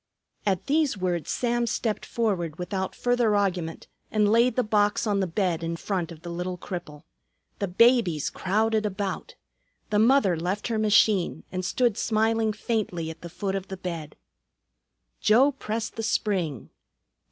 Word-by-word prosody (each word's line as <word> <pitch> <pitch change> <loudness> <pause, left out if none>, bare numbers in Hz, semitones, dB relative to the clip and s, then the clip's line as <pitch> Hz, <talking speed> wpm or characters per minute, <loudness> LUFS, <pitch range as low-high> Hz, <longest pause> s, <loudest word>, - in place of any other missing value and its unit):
At 190 -3 +1
these 290 -5 +2
words 180 -3 -2
Sam 240 -1 0
stepped 225 -1 -2
forward 180 -9 -1
without 190 +1 -3
further 245 -3 +2
argument 180 -5 -1 0.2
and 210 -1 +2
laid 235 +1 +4
the 250 - +2
box 210 -1 +2
on 205 -2 +1
the 190 - +1
bed 175 -1 0
in 165 0 -2
front 175 -1 -3
of 160 -1 -12
the 175 - -6
little 180 +1 -3
cripple. 170 -5 -7 0.6
The 200 - -1
babies 190 - +3
crowded 215 +3 +1
about. 200 -2 -3 0.6
The 210 - +3
mother 225 -5 +4
left 180 +7 -2
her 225 -2 0
machine 210 -3 +3
and 185 0 -3
stood 235 +3 +1
smiling 220 0 +1
faintly 205 -7 -2
at 160 - -13
the 170 - -7
foot 190 +3 -3
of 195 0 -3
the 190 - -6
bed. 170 -4 -6 1.0
Joe 255 +7 +5
pressed 225 -5 -4
the - - -1
spring. 190 - -1
205 Hz, 155 wpm, -26 LUFS, 180-225 Hz, 1.0 s, Joe